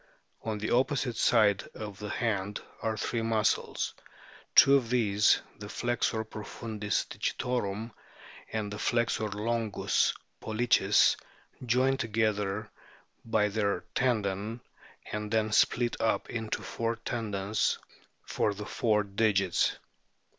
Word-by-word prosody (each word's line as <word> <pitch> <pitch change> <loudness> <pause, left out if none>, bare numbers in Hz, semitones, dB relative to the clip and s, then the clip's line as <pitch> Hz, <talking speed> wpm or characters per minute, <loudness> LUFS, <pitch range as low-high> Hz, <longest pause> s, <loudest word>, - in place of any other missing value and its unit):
On 110 -1 -3
the 105 - -3
opposite 125 -1 +1
side 105 -6 +4
of 105 -3 -7
the 105 0 -5
hand 105 -2 -1 0.2
are 110 -1 -1
three 115 +1 -1
muscles; 110 -2 0 0.6
two 130 +3 +8
of 130 -5 +3
these, 105 -4 +3 0.2
the 105 -1 -7
flexor 120 -1 0
profundis 105 -1 -3
digitorum 115 -3 -2 0.6
and 105 -2 -3
the 105 - -6
flexor 115 -2 +1
longus 110 +1 0 0.3
pollicis, 115 +2 +3 0.5
join 130 +3 +2
together 105 -2 -1 0.5
by 110 -2 +2
their 100 -3 0
tendon, 110 -2 0 0.5
and 105 0 -3
then 110 0 +1
split 120 +3 +3
up 115 - 0
into 110 -2 -3
four 115 0 -2
tendons 105 -3 -1 0.5
for 105 - 0
the 105 +1 -6
four 105 -2 +1
digits. 100 -2 +1
110 Hz, 110 wpm, -30 LUFS, 105-115 Hz, 0.6 s, two